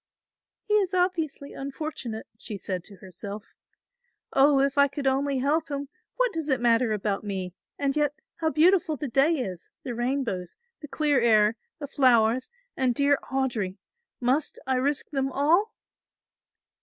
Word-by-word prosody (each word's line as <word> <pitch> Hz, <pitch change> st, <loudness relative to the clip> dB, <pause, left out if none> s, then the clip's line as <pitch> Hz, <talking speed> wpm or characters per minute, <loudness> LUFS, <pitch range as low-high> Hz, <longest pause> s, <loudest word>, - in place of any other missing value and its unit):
"He 420 Hz, -, -2 dB
is 390 Hz, -3 st, +2 dB
obviously 335 Hz, -6 st, -1 dB
unfortunate," 270 Hz, -5 st, -5 dB
she 215 Hz, -1 st, -7 dB
said 185 Hz, -2 st, -4 dB
to 205 Hz, -, -12 dB
herself, 200 Hz, +3 st, -8 dB, 0.9 s
"Oh, 275 Hz, 0 st, +5 dB
if 275 Hz, 0 st, +2 dB
I 280 Hz, 0 st, +5 dB
could 280 Hz, 0 st, -6 dB
only 270 Hz, +1 st, +1 dB
help 295 Hz, +5 st, 0 dB
him, 280 Hz, -1 st, -4 dB, 0.3 s
what -, -, +1 dB
does 320 Hz, -2 st, -3 dB
it 265 Hz, -2 st, +2 dB
matter 235 Hz, -1 st, +3 dB
about 205 Hz, -1 st, -1 dB
me, 190 Hz, -3 st, -4 dB, 0.2 s
and 280 Hz, 0 st, 0 dB
yet 295 Hz, -1 st, +1 dB, 0.2 s
how 320 Hz, -1 st, 0 dB
beautiful 330 Hz, 0 st, +3 dB
the 290 Hz, -, -4 dB
day 275 Hz, +6 st, +3 dB
is, 190 Hz, -, -5 dB
the 250 Hz, -, -4 dB
rainbows, 240 Hz, -7 st, -2 dB, 0.3 s
the 295 Hz, -, -7 dB
clear 295 Hz, -2 st, +2 dB
air, 215 Hz, -2 st, +4 dB, 0.2 s
the 300 Hz, -, -5 dB
flowers 250 Hz, -3 st, +3 dB, 0.3 s
and 255 Hz, -2 st, +1 dB
dear 280 Hz, +1 st, +3 dB
Audry; 235 Hz, -8 st, -1 dB, 0.4 s
must 260 Hz, +5 st, 0 dB
I 260 Hz, -1 st, +1 dB
risk 285 Hz, +4 st, -1 dB
them 270 Hz, -2 st, -1 dB
all?" 335 Hz, -, +2 dB
270 Hz, 155 wpm, -26 LUFS, 230-295 Hz, 0.9 s, Oh